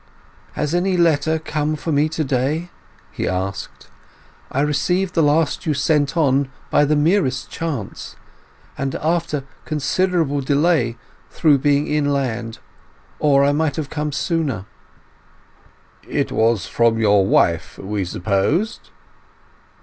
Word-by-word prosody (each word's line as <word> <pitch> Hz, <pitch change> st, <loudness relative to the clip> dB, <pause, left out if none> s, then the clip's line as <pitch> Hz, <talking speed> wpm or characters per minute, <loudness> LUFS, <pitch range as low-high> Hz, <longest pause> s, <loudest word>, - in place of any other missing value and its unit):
"Has 150 Hz, +1 st, -2 dB
any 180 Hz, +1 st, +1 dB
letter 160 Hz, -2 st, +2 dB
come 155 Hz, -1 st, -2 dB
for 160 Hz, +2 st, -4 dB
me 145 Hz, 0 st, +3 dB
lately?" 150 Hz, +4 st, -1 dB, 0.4 s
he -, -, -3 dB
asked. 95 Hz, +1 st, -4 dB, 0.6 s
"I 135 Hz, -, 0 dB
received 180 Hz, +6 st, 0 dB
the 165 Hz, -, +2 dB
last 155 Hz, +3 st, +1 dB
you 150 Hz, -, +1 dB
sent 145 Hz, +2 st, +1 dB
on 140 Hz, -3 st, +2 dB, 0.2 s
by 145 Hz, -, +4 dB
the 150 Hz, +1 st, +2 dB
merest 145 Hz, -5 st, +1 dB
chance, 145 Hz, -12 st, -5 dB, 0.6 s
and 135 Hz, -1 st, -3 dB
after 160 Hz, -3 st, -1 dB, 0.2 s
considerable 155 Hz, -1 st, 0 dB
delay 140 Hz, -4 st, +1 dB, 0.3 s
through 150 Hz, -4 st, +3 dB
being 145 Hz, +1 st, +2 dB
inland; 135 Hz, -7 st, -1 dB, 0.6 s
or 140 Hz, -2 st, +4 dB
I 140 Hz, -, +4 dB
might 150 Hz, 0 st, 0 dB
have 155 Hz, -3 st, -4 dB
come 150 Hz, -1 st, -2 dB
sooner." 140 Hz, -, -1 dB, 1.4 s
"It -, -, -1 dB
was 110 Hz, -4 st, +2 dB
from 115 Hz, -1 st, +2 dB
your 105 Hz, -3 st, +4 dB
wife, 85 Hz, -3 st, +1 dB
we 100 Hz, 0 st, -3 dB
supposed?" 100 Hz, -, -1 dB
145 Hz, 120 wpm, -20 LUFS, 130-160 Hz, 1.4 s, by